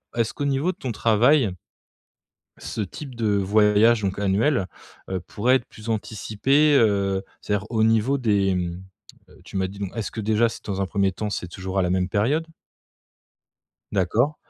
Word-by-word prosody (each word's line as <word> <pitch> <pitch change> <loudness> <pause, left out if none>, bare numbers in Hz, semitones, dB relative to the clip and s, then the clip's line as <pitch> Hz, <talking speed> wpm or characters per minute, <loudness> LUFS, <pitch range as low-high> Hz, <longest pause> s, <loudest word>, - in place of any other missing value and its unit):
est-ce 115 -1 0
qu'au 145 - -3
niveau 140 +5 +1
de - - -15
ton 130 - -4
travail, 115 +4 +3 1.1
ce 110 - -5
type 130 +7 -7
de 115 -2 -1
voyage 105 +3 +4
donc 100 -1 -2
annuel, 100 +3 +1 0.4
heu, 95 -1 -2
pourrait 115 +8 +1
être 130 - -1
plus 110 +1 -11
anticipé? 115 +7 +1
Heu, 100 -5 +2 0.2
c'est-à-dire 105 -1 -2
au 110 -2 +2
niveau 115 +5 +3
des, 100 -5 +2
hem, 90 -1 -2 0.5
heu, - - -19
tu - - -7
m'as 95 0 0
dit 100 +2 -11
donc 100 -2 -4
est-ce 115 -3 -3
que 110 - -5
déjà, 110 +2 +2
c'est, - - -10
dans 100 -1 -2
un - - +1
1er 95 0 +1
temps, 105 +3 -4
c'est 90 - -3
toujours 95 +2 -4
à - - +4
la 90 - 0
même 90 0 0
période? 135 - 0 1.5
D'accord. 110 - +1
105 Hz, 180 wpm, -24 LUFS, 95-120 Hz, 1.5 s, voyage